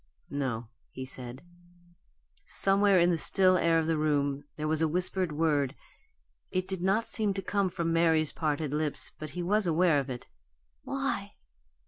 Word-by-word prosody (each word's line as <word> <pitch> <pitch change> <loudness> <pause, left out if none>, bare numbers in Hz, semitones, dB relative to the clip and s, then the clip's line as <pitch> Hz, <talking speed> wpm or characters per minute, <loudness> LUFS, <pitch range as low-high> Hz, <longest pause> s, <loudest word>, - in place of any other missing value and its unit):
"No," 125 -5 -3 0.2
he 130 - -7
said. 130 0 -8 1.0
Somewhere 195 -1 +3
in 175 +1 +4
the 165 - 0
still 185 +3 +4
air 165 -2 +3
of 160 - +1
the 160 -1 0
room 145 -2 0
there 155 0 -3
was 155 0 0
a 160 - +3
whispered 180 +1 -1
word; 150 -3 +1 0.7
it 185 0 -2
did 190 -2 -4
not 195 +5 +2
seem 210 -3 -1
to 195 - -2
come 200 0 0
from 170 -2 -2
Mary's 160 -2 +3
parted 150 -2 -2
lips, 150 -1 0
but 155 - -6
he 175 - -1
was 205 +2 +1
aware 165 -2 +3
of 135 0 -4
it. 125 -1 -6 0.6
"Why?" - - -3
165 Hz, 165 wpm, -29 LUFS, 145-185 Hz, 1.0 s, in